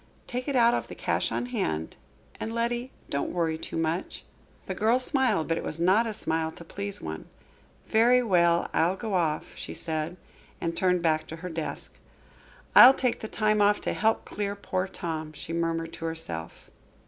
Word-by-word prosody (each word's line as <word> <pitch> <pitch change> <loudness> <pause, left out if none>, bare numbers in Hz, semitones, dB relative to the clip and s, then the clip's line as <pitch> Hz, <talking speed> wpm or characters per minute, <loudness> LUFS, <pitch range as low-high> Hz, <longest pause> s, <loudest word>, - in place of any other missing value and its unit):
Take 250 +2 -4
it 280 - -1
out 235 -1 +5
of - - -1
the - - -9
cash - - -1
on - - -1
hand. 135 - -2 0.4
And, 220 - -3
Letty, 240 +2 -1 0.2
don't 140 - -1
worry 165 -2 0
too 160 - -5
much." 165 +2 -2 0.4
The - - -3
girl 225 +3 +3
smiled, 255 - +1
but 165 0 0
it - - -6
was 155 - -4
not 190 +7 +4
a 220 - -3
smile 160 -2 -1
to - - -11
please 200 +4 -3
one. 80 0 -5 0.6
"Very 245 +3 +5
well, 170 -5 +3
I'll 175 +3 +2
go 215 +1 -4
off," 160 -4 0
she - - -7
said, 160 +1 -3 0.4
and 165 0 -2
turned 180 -2 +2
back 155 -1 +1
to 160 - -6
her - - -3
desk. 160 -2 -4 0.7
"I'll 260 +2 +10
take 250 -3 0
the 220 - -5
time 215 -1 +1
off 205 0 +4
to - - -1
help 220 +1 +1
clear 200 -1 -3
poor 190 -2 -2
Tom," 160 -5 -5
she 155 +2 -7
murmured 165 -1 -1
to 165 - -6
herself. 85 - -6
180 Hz, 185 wpm, -27 LUFS, 160-220 Hz, 0.7 s, I'll